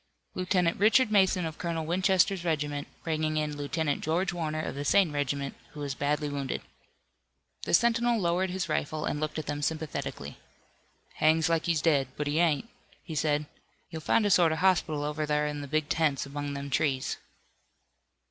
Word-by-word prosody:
"Lieutenant 180 -2 +1
Richard 220 +3 +4
Mason 190 -3 +3
of 160 0 -6
Colonel 165 -2 -2
Winchester's 185 +2 +2
regiment, 145 -3 -1 0.2
bringing 155 -1 -1
in 150 -1 -1
Lieutenant 145 +1 -2
George 175 +4 0
Warner 155 -2 -2
of - - -4
the 140 - -4
same 180 +3 +4
regiment, 140 -1 -2 0.2
who 150 - -6
is 140 -1 -2
badly 145 +2 -1
wounded." 140 -2 -3 1.0
The - - +4
sentinel 235 +1 +3
lowered 180 +1 +1
his 185 0 -2
rifle 155 +1 -2
and 150 - -2
looked 155 0 -3
at 155 - -3
them 145 0 -3
sympathetically. 160 0 -4 0.8
"Hangs 160 +1 +3
like 165 -1 +1
he's 165 -3 +1
dead, 145 -5 +3
but 150 - -2
he 145 +2 0
ain't," 170 +4 +2 0.4
he 165 - -7
said. 150 0 +1 0.5
"You'll 160 -1 -5
find 210 +7 +2
a 205 - +2
sort 170 -3 +5
of 160 - -1
hospital 160 -5 +2
over 150 +1 -2
thar 150 0 +1
in 150 -1 -3
the 140 - -6
big 155 +1 0
tents 150 -5 +1
among 145 0 -5
them 140 0 -6
trees." 135 -2 0
155 Hz, 175 wpm, -29 LUFS, 145-175 Hz, 1.0 s, sort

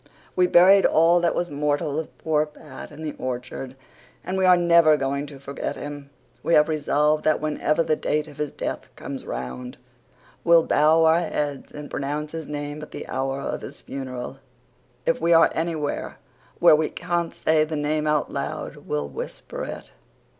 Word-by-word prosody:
We 180 -1 +4
buried 190 +3 +7
all 165 +2 +4
that 170 -1 +1
was 175 -2 -2
mortal 145 0 0
of 160 - -8
poor 155 -1 +1
Pat 150 -2 -11
in 150 +2 -9
the 150 - -3
orchard 130 +1 -5 0.5
and 185 - -3
we 190 0 +2
are 180 -1 +7
never 170 -3 +5
going 140 +1 -2
to 140 -1 -11
forget 140 +1 -5
him. 145 -1 -7 0.3
We 170 - +2
have 150 - +5
resolved 150 0 +1
that 155 - +2
whenever 155 +1 0
the 155 - +1
date 150 0 -1
of 145 -1 -13
his 150 -1 -2
death - - -5
comes - - -7
round 125 - -6 0.7
we'll 170 -1 +6
bow 160 +2 +4
our 160 +1 +5
heads 145 -4 -3
and 150 0 -7
pronounce 150 +2 -3
his 160 -2 -6
name 145 0 -5
at 150 - -9
the - - -8
hour 135 +1 -2
of - - -3
his - - -10
funeral. 130 -1 -6 0.7
If - - +1
we 170 - +4
are 165 0 +6
anywhere 160 -3 -2 0.4
where - - +7
we 155 0 0
can't 175 -1 -2
say 155 -1 +3
the 155 0 -3
name 150 +1 0
out 150 -1 0
loud - - -4
we'll 75 -1 -3
whisper - - -7
it. - - -8
150 Hz, 180 wpm, -24 LUFS, 145-165 Hz, 0.7 s, buried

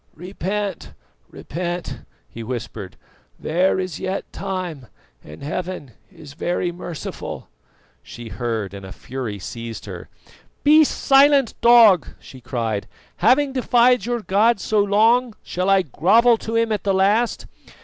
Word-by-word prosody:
"Repent, 190 +2 -5 0.4
repent!" 175 +2 -5 0.3
he 115 - -10
whispered, 115 -5 -6 0.4
"there 180 +4 +1
is 185 -4 -4
yet 190 +1 -3
time 180 -9 -5 0.4
and 75 - -12
Heaven 165 -2 -5 0.2
is 145 -2 -13
very 175 +3 -2
merciful." 175 -2 -7 0.5
She 120 -1 -10
heard, 110 -2 -3
and 100 -1 -9
a 95 - -9
fury 120 0 -6
seized 115 +4 -7
her. - - -9 0.5
"Be 305 +2 +7
silent, 275 -3 +4
dog!" 230 -7 +6
she 130 - -14
cried. 115 -4 -3 0.3
"Having 270 +4 +3
defied 245 -1 +3
your 240 -1 -1
God 210 +3 +2
so 215 +2 0
long, 220 +4 +3
shall 180 +2 -2
I 195 -1 +4
grovel 225 - +3
to 225 - -5
Him 230 -1 +1
at 210 -3 -1
the 195 -1 +1
last? 210 +5 +1
185 Hz, 130 wpm, -21 LUFS, -, 0.5 s, Be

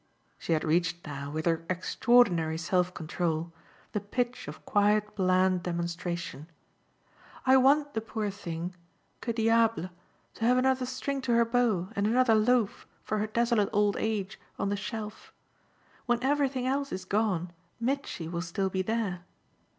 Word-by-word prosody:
She - - -1
had 155 - +1
reached 170 +2 0
now, 140 -1 -5
with 155 +2 -3
her 165 -1 +1
extraordinary 185 -3 +3
self 180 +2 +1
control, 165 -1 -2 0.4
the 210 - -1
pitch 245 - -3
of 150 +1 -9
quiet 210 +1 +2
bland 185 -1 +3
demonstration. 170 -2 -4 1.0
"I 260 0 +7
want 285 +3 +4
the 220 - -1
poor 215 -2 -3
thing, 175 -2 -5 0.5
que 235 - -2
diable, 225 -4 +2 0.4
to - - -7
have 250 +2 +4
another 260 0 +2
string 270 +2 -3
to 245 -2 0
her 235 0 +5
bow 230 -7 +1
and 200 +1 +1
another 240 +1 +4
loaf, 220 0 +2 0.2
for 215 - -1
her 215 - 0
desolate 235 -1 +2
old 205 0 +2
age, 210 -3 -2 0.2
on 200 - -1
the 205 - 0
shelf. 215 +1 -6 0.8
When 240 0 +1
everything 270 -2 +1
else 275 +2 -1
is 185 0 -4
gone 190 -4 0 0.3
Mitchy 245 - -2
will 170 +1 -3
still 190 +2 -2
be 190 - 0
there. 195 -3 -2
205 Hz, 150 wpm, -29 LUFS, 175-235 Hz, 1.0 s, I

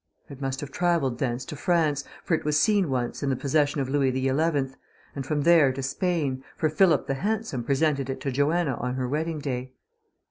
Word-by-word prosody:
It 140 -1 -10
must 135 -1 -2
have 145 -1 -7
travelled 165 -8 +1
thence 125 -1 -2
to - - -7
France, 155 -3 +1 0.2
for - - -1
it 160 - +1
was 150 0 +2
seen 195 +1 +3
once 125 -2 -2
in 140 - 0
the 135 - +1
possession 145 +2 +1
of 135 - -2
Louis 135 -1 +2
XI; 130 +1 0 0.9
and 135 -2 -5
from 145 0 0
there 165 -5 +6
to 135 +1 -5
Spain, 140 -2 -1
for 155 - +1
Philip 160 -1 +3
the 135 - -1
Handsome 205 - -2
presented 140 0 +1
it 135 - -3
to 135 - -2
Joanna 145 +1 +1
on 125 +1 -3
her 130 -1 -2
wedding 155 +4 -2
day. 130 -3 -4
140 Hz, 205 wpm, -26 LUFS, 130-160 Hz, 0.9 s, there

